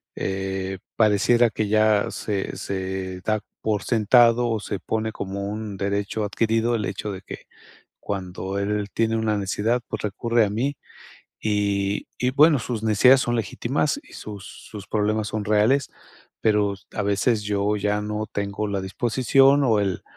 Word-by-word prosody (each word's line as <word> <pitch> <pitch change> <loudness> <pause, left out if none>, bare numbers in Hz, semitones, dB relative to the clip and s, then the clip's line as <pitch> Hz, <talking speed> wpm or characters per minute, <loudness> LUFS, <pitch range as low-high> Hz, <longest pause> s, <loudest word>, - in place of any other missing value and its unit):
eh, 95 0 -3 0.2
pareciera 115 +2 +4
que 105 +1 -2
ya 110 -1 +3
se 100 -3 -3
se, 95 -1 -4
da 110 +2 0 0.2
por 105 -3 -1
sentado 120 +1 +4
o 110 -2 0
se 100 -1 -4
pone 110 0 -2
como 100 0 -5
un 105 -2 -5
derecho 100 +2 -2
adquirido 115 +3 +1
el 105 -3 -1
hecho 100 +2 -4
de 95 -1 -7
que, - - -10 0.5
cuando 95 0 -4
él 105 0 -1
tiene 115 0 +1
una 110 -1 0
necesidad, 105 +5 0
pues, - - -4
recurre 115 +2 +1
a - - -2
mí 135 +7 -1 0.6
y 100 -1 0
y 125 0 +1
bueno, 150 +2 +5
sus 115 -2 -4
necesidades 125 +5 +6
son 120 - -1
legítimas 120 +6 -1
y - - -19
sus 105 -2 -8
sus 105 -3 -10
problemas 105 0 0
son 110 -2 -3
reales, 110 +7 +2 0.5
pero 105 -2 +2 0.2
a 105 - -1
veces 105 +2 +1
yo 105 0 0
ya 105 +1 0
no 105 +1 -3
tengo 100 +1 -2
la 100 -1 -1
disposición 130 +7 +3
o 110 -4 +3
el 95 -3 -1
105 Hz, 160 wpm, -24 LUFS, 100-115 Hz, 0.6 s, necesidades